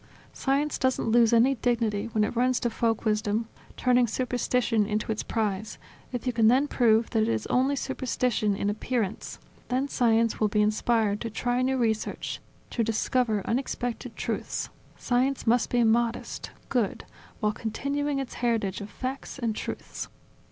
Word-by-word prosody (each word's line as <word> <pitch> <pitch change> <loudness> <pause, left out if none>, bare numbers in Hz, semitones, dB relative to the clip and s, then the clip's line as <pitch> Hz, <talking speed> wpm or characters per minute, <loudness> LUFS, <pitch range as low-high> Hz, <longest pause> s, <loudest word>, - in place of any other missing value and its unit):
Science 280 +2 0
doesn't 260 -3 +1
lose 235 -1 +5
any 235 +3 +5
dignity 230 -4 0
when 215 -1 +2
it 210 - -1
runs 250 +1 +2
to 240 - -1
folk 225 0 0
wisdom, 215 +1 0 0.3
turning 250 -1 +3
superstition 245 -2 0
into 215 +1 -1
its 215 - -1
prize, 215 -2 -2 0.3
if 245 -1 -4
you 250 - 0
can 225 -1 +4
then 260 +5 +4
prove 225 -4 +3
that 225 - +2
it - - +1
is 110 -1 -1
only 265 +3 +3
superstition 250 -5 0
in 200 - -2
appearance; 215 0 -2 0.3
then 260 +3 0
science 230 -3 +2
will 215 - +3
be 210 +1 0
inspired 215 -1 +1
to 230 - -3
try 245 +3 0
new 260 +1 +1
research, 220 -3 -1 0.3
to 235 - 0
discover 225 -1 +1
unexpected 245 -1 -2
truths. - - -3 0.3
Science 255 +2 0
must 235 0 +3
be 240 -1 +3
modest, 230 +1 0 0.2
good, 240 -6 0 0.3
while 210 -2 +1
continuing 280 +6 -2
its 270 -2 -4
heritage 225 -5 -1
of 205 - -7
facts 265 +5 -5
and 230 -4 -1
truths. - - -5
235 Hz, 160 wpm, -27 LUFS, 215-250 Hz, 0.3 s, lose